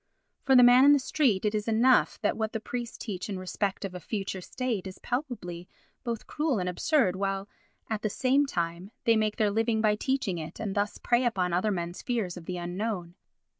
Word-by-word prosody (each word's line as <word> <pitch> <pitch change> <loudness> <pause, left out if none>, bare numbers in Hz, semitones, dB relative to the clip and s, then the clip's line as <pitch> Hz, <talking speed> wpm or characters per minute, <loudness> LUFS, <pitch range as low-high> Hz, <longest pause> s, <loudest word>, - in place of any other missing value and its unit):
For 265 - +3
the 250 - +9
man 245 +2 +8
in 285 +1 +8
the - - +6
street 255 -7 +1
it 210 - +1
is 210 0 -2
enough 235 +3 +3
that 210 - +1
what 220 0 -2
the 225 - -1
priests 240 +1 -5
teach 195 -3 -5
in 195 - -3
respect 195 +2 -2
of 190 - -6
a 180 - -6
future 195 +1 -4
state 230 -2 -3
is 190 - -9
palpably 210 - -4 0.4
both 235 -2 -4
cruel 300 -5 -1
and 180 -2 -1
absurd 190 - +2
while, 195 0 -2 0.4
at 220 -2 -2
the 215 - 0
same 270 +6 +2
time, 170 -3 -3
they 230 - +4
make 215 -1 +1
their 210 -2 +2
living 225 +1 +1
by 215 -1 +3
teaching 210 -7 -1
it 160 +1 -8
and 210 -3 -3
thus 205 +1 -1
prey 240 +1 +2
upon 185 -7 0
other 185 +5 +1
men's 175 -3 -3
fears 225 -8 -2
of 175 -2 -10
the 180 +1 -4
unknown. 175 0 -3
210 Hz, 210 wpm, -28 LUFS, 185-240 Hz, 0.4 s, the